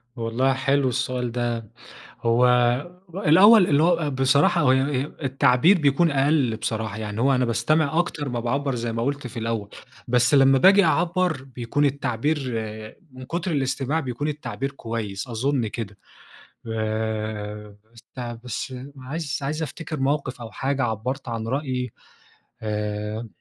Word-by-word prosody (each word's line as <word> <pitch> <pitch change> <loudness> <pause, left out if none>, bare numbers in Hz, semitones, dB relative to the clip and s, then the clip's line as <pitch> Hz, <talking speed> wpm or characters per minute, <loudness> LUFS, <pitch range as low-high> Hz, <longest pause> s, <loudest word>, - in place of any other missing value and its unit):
والله 120 +3 0
حلو 135 0 +1
السؤال 125 -1 -2
ده، 120 -2 -2 0.5
هو 120 +1 +4 0.7
الأول 195 +3 +6
اللي 145 -1 +3
هو 165 -3 +2
بصراحة 140 +5 +3
هو 145 - +3
و - - +6 0.5
التعبير 135 +6 +4
بيكون 155 +3 +3
أقل 140 -4 +2
بصراحة، 110 -2 -3
يعني 105 0 -4
هو 135 +2 +3
أنا 125 0 +2
باستمع 155 +6 +1
أكتر 165 -4 -1
ما 120 -2 -2
باعبّر 135 +3 -1
زي 120 -1 -3
ما 115 0 -2
قُلت 140 +1 -2
في 120 0 -7
الأول، 115 -2 -2 0.4
بس 125 +4 +3
لمّا 135 -1 +6
باجي 195 +5 +6
أعبّر 170 -2 +1
بيكون 130 +2 -2
التعبير 140 +1 0 0.7
من 130 0 -10
كتر 170 +6 -3
الاستماع 135 +1 0
بيكون 135 +1 -3
التعبير 145 -2 -4
كويس 115 -5 -5
أظن 125 +1 0
كده، 105 -2 -6 0.7
آآ، 110 -1 -3 0.2
بس 115 - -17 0.4
بس 125 +1 -5 0.2
عايز 140 +3 -4
عايز 150 +4 -2
أفتكر 155 +1 -6
موقف 135 -2 -1
أو 115 -1 -8
حاجة 135 0 -1
عبّرت 120 +4 -3
عن 115 -1 -4
رأيي 130 -2 -2 0.7
آآ، 105 +1 -3
130 Hz, 140 wpm, -24 LUFS, 115-145 Hz, 0.7 s, الأول